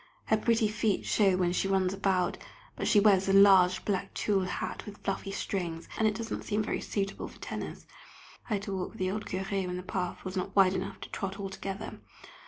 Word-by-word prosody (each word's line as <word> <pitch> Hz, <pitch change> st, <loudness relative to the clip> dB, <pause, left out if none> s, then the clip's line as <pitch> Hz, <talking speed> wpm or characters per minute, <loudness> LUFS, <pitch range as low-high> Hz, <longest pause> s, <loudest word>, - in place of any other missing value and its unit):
Her 220 Hz, -, +3 dB
pretty 225 Hz, 0 st, +2 dB
feet 215 Hz, -1 st, 0 dB
show 195 Hz, -4 st, +3 dB
when 180 Hz, -1 st, +2 dB
she 195 Hz, -, +1 dB
runs 190 Hz, -1 st, +2 dB
about, 190 Hz, -2 st, 0 dB, 0.4 s
but -, -, -2 dB
she 210 Hz, -, +6 dB
wears 195 Hz, -2 st, +4 dB
a -, -, +3 dB
large 195 Hz, -2 st, +6 dB
black 195 Hz, -3 st, -2 dB
tulle 195 Hz, -3 st, +1 dB
hat -, -, -4 dB
with 205 Hz, 0 st, -8 dB
fluffy 195 Hz, 0 st, -2 dB
strings, 175 Hz, -4 st, -3 dB
and 220 Hz, -, +2 dB
it 215 Hz, -, 0 dB
does 225 Hz, -1 st, -5 dB
not -, -, -3 dB
seem 210 Hz, 0 st, 0 dB
very -, -, -2 dB
suitable 195 Hz, -1 st, -3 dB
for -, -, -14 dB
tennis. -, -, -6 dB, 0.6 s
I -, -, 0 dB
had 200 Hz, -, -3 dB
to 200 Hz, -1 st, -3 dB
walk 185 Hz, -1 st, -3 dB
with -, -, -14 dB
the 185 Hz, 0 st, 0 dB
old 210 Hz, +1 st, -4 dB
Curé 190 Hz, 0 st, -2 dB
when 180 Hz, 0 st, -3 dB
the 180 Hz, -, -6 dB
path 180 Hz, 0 st, -3 dB
was 185 Hz, +1 st, -4 dB
not 190 Hz, +1 st, -3 dB
wide 190 Hz, -2 st, +6 dB
enough 190 Hz, +1 st, -4 dB
to -, -, -7 dB
trot 195 Hz, -1 st, -4 dB
all 195 Hz, -1 st, -4 dB
together. 195 Hz, +2 st, -6 dB
195 Hz, 225 wpm, -30 LUFS, 185-205 Hz, 0.6 s, she